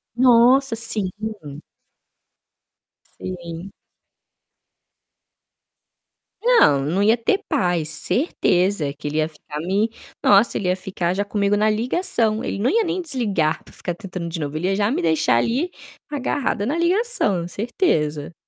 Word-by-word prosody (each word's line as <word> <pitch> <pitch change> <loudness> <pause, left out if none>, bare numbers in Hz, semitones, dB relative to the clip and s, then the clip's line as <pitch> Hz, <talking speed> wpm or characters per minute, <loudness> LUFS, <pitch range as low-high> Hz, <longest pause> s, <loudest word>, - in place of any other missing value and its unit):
Nossa! 250 +1 +5
Sim. 220 -4 -1 2.1
Sim. 175 0 -7 2.7
Não, 460 - +5
não 180 +6 0
ia 225 +3 +4
ter 310 - +1
paz, 175 -4 0
certeza. 180 - 0
Que 145 0 -8
ele 150 +2 -3
ia 155 0 +2
ficar 150 -1 -9
me 195 +7 0 0.3
nossa, 205 +3 +5
ele 185 - -2
ia 180 - +2
ficar 185 -2 -2
já 200 +1 -1
comigo 205 0 +1
na 215 +1 +3
ligação. 225 - 0
Ele - - -3
não 235 - +2
ia 455 +1 +2
nem 360 +1 -2
desligar 205 - -1
para - - -17
ficar 175 -2 -5
tentando 180 -4 -6
de 165 0 -5
novo, 145 0 -4
ele 180 +3 -1
ia 195 - +1
já 205 +1 +1
me - - -1
deixar 155 -6 +2
ali, 265 - 0 0.4
agarrada 275 -6 -1
na 295 +7 -1
ligação, 340 - +1
certeza. 165 - -1
200 Hz, 135 wpm, -21 LUFS, 170-245 Hz, 2.7 s, Nossa